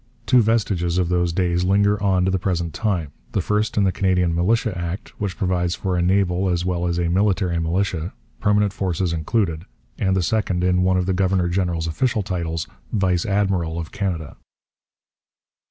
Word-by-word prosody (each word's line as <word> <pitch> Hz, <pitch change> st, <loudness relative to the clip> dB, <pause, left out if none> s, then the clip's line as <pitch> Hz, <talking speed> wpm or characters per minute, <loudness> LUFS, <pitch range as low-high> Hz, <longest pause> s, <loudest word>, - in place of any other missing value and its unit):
Two 125 Hz, -2 st, +5 dB
vestiges 100 Hz, -6 st, +1 dB
of 90 Hz, -2 st, +1 dB
those 90 Hz, -1 st, +1 dB
days 90 Hz, 0 st, 0 dB
linger 100 Hz, +2 st, +2 dB
on 95 Hz, -2 st, +2 dB
to 95 Hz, -, +1 dB
the 95 Hz, -, 0 dB
present 85 Hz, -3 st, -2 dB
time, 90 Hz, -9 st, -1 dB, 0.2 s
the -, -, +1 dB
first 105 Hz, +1 st, 0 dB
in 105 Hz, -, +4 dB
the 95 Hz, -, +3 dB
Canadian 90 Hz, -3 st, +1 dB
Militia 105 Hz, +5 st, +1 dB
Act, 85 Hz, +4 st, -4 dB
which 95 Hz, -4 st, -2 dB
provides 90 Hz, -2 st, 0 dB
for 95 Hz, -2 st, -2 dB
a 90 Hz, -, +1 dB
naval 95 Hz, 0 st, +2 dB
as 90 Hz, 0 st, 0 dB
well 90 Hz, -1 st, -1 dB
as 85 Hz, -1 st, -1 dB
a 85 Hz, -1 st, 0 dB
military 95 Hz, -1 st, +1 dB
militia, 85 Hz, 0 st, -1 dB, 0.3 s
permanent 105 Hz, -1 st, +2 dB
forces 90 Hz, -2 st, -1 dB
included, 85 Hz, 0 st, -1 dB, 0.4 s
and 95 Hz, -1 st, +1 dB
the 95 Hz, -, +1 dB
second 95 Hz, -1 st, 0 dB
in 90 Hz, 0 st, +2 dB
one 95 Hz, 0 st, +3 dB
of 90 Hz, -, 0 dB
the 95 Hz, -, 0 dB
governor 95 Hz, -1 st, +1 dB
general's 85 Hz, -2 st, -1 dB
official 105 Hz, +7 st, 0 dB
titles 85 Hz, -4 st, -3 dB, 0.2 s
'Vice 95 Hz, -3 st, +1 dB
Admiral' 95 Hz, -5 st, 0 dB
of 85 Hz, 0 st, -5 dB
Canada. 90 Hz, -7 st, -3 dB
90 Hz, 180 wpm, -22 LUFS, 85-100 Hz, 0.4 s, Two